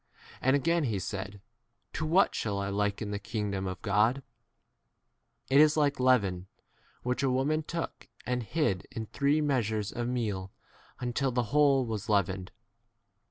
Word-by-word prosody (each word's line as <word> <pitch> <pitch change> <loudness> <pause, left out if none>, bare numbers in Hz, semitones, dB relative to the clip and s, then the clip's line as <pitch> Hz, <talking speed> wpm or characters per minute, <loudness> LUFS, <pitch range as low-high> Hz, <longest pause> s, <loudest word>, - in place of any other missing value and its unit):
And 130 +2 +3
again 165 +3 +2
he 110 -5 -1
said, 95 +1 -5 0.5
To 155 - -2
what 185 +5 +4
shall 105 -3 -2
I 100 0 -2
liken 105 +1 -1
the 100 - -2
kingdom 105 -3 -3
21 95 - -2
of 95 - -9
God? 110 +6 +2 1.2
It 140 +2 +6
is 155 0 +5
like 145 -2 +2
leaven, 100 -8 +2 0.6
which 125 +1 -1
a 135 - +2
woman 135 +5 +1
took 165 +2 -5 0.2
and 125 0 -1
hid 110 - -1
in 110 - -5
three 140 +6 +1
measures 110 -8 0
of 120 0 -3
meal 105 -6 -2 0.5
until 125 +2 0
the 125 0 +1
whole 140 -3 +4
•was 110 -1 -4
leavened. 95 -2 0
120 Hz, 155 wpm, -30 LUFS, 100-140 Hz, 1.2 s, It